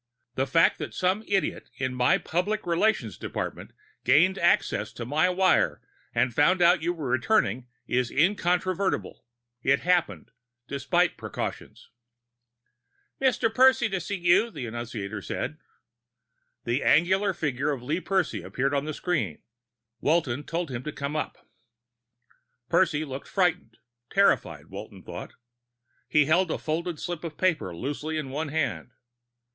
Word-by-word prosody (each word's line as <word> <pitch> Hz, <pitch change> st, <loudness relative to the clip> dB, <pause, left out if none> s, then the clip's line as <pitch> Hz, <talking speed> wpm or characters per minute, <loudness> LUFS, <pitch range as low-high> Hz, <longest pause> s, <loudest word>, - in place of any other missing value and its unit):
The 135 Hz, +2 st, -1 dB
fact 165 Hz, +5 st, +3 dB
that -, -, -6 dB
some 185 Hz, +4 st, +1 dB
idiot 195 Hz, -6 st, -1 dB
in 130 Hz, -1 st, -2 dB
my 125 Hz, 0 st, +3 dB
public 200 Hz, +6 st, -2 dB
relations 170 Hz, -, +1 dB
department -, -, -5 dB, 0.3 s
gained 185 Hz, +6 st, +4 dB
access 110 Hz, -9 st, +2 dB
to 120 Hz, -, -6 dB
my 155 Hz, +8 st, +2 dB
wire 185 Hz, +1 st, +3 dB, 0.4 s
and 120 Hz, +1 st, +2 dB
found 150 Hz, +9 st, +4 dB
out 175 Hz, 0 st, +5 dB
you 170 Hz, +2 st, 0 dB
were 160 Hz, -6 st, -5 dB
returning 130 Hz, -, +1 dB, 0.2 s
is 125 Hz, -1 st, 0 dB
incontrovertible; 185 Hz, +3 st, 0 dB, 0.4 s
it 140 Hz, +2 st, +2 dB
happened, 170 Hz, -, 0 dB, 0.4 s
despite 170 Hz, +6 st, +1 dB
precautions." -, -, -6 dB, 1.3 s
"Mr. 245 Hz, -4 st, +2 dB
Percy 260 Hz, -1 st, +5 dB
to 190 Hz, -1 st, -1 dB
see 190 Hz, +4 st, -4 dB
you," 190 Hz, +5 st, +3 dB
the 145 Hz, -, -6 dB
annunciator 110 Hz, -3 st, -5 dB
said. 155 Hz, +9 st, -4 dB, 1.0 s
The 120 Hz, +4 st, 0 dB
angular 190 Hz, +5 st, +3 dB
figure 145 Hz, -4 st, -1 dB
of 130 Hz, -4 st, -4 dB
Lee 155 Hz, +8 st, -1 dB
Percy 190 Hz, -2 st, 0 dB
appeared 135 Hz, +2 st, -1 dB
on 140 Hz, 0 st, 0 dB
the 155 Hz, -1 st, -4 dB
screen. 150 Hz, -, -2 dB, 0.6 s
Walton 145 Hz, -4 st, +1 dB
told 165 Hz, -3 st, -3 dB
him 120 Hz, -1 st, -4 dB
to 150 Hz, -, -5 dB
come 140 Hz, +1 st, -4 dB
in. 155 Hz, -, -1 dB, 1.4 s
Percy 155 Hz, -5 st, +2 dB
looked 135 Hz, -1 st, -7 dB
frightened 180 Hz, -, 0 dB, 0.3 s
terrified, 80 Hz, -, +2 dB
Walton 95 Hz, +1 st, -10 dB
thought. 85 Hz, 0 st, -8 dB, 0.7 s
He 150 Hz, -1 st, +4 dB
held 170 Hz, +4 st, +3 dB
a -, -, -1 dB
folded 165 Hz, +1 st, -3 dB
slip 175 Hz, -2 st, -4 dB
of 160 Hz, -3 st, -6 dB
paper 155 Hz, -, 0 dB
loosely 145 Hz, -, -3 dB
in 145 Hz, -4 st, -4 dB
one 150 Hz, +3 st, -2 dB
hand. 140 Hz, -, -2 dB
155 Hz, 140 wpm, -27 LUFS, 130-180 Hz, 1.4 s, out